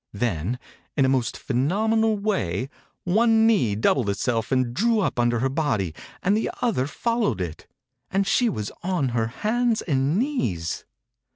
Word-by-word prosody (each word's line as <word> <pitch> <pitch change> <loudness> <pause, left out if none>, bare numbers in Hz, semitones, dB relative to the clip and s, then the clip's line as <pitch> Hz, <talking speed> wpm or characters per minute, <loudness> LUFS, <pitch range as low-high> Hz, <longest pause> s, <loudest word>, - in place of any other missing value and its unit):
Then, 100 0 -1 0.4
in 135 - +4
a - - +3
most 130 -4 0
phenomenal 215 - +1
way, 135 - -1 0.3
one 225 +4 +4
knee 190 - +3
doubled 110 +1 +2
itself 115 +3 -1
and 130 -2 +1
drew 225 - +2
up 185 - 0
under 120 0 +2
5* - - -2
THE - - +1
INCUBATOR - - +2 0.3
BABY 95 - -1
her - - -4
body, - - -22 0.3
and 195 +2 +3
the 220 - 0
other 205 - +1
followed 230 - 0
it, 85 -4 -5 0.4
and 195 +1 +1
she 240 +4 +3
was 105 - -4
on 175 -7 0
her 115 -2 0
hands 225 - 0
and 140 +1 +1
knees. 120 - -1
135 Hz, 175 wpm, -24 LUFS, -, 0.4 s, in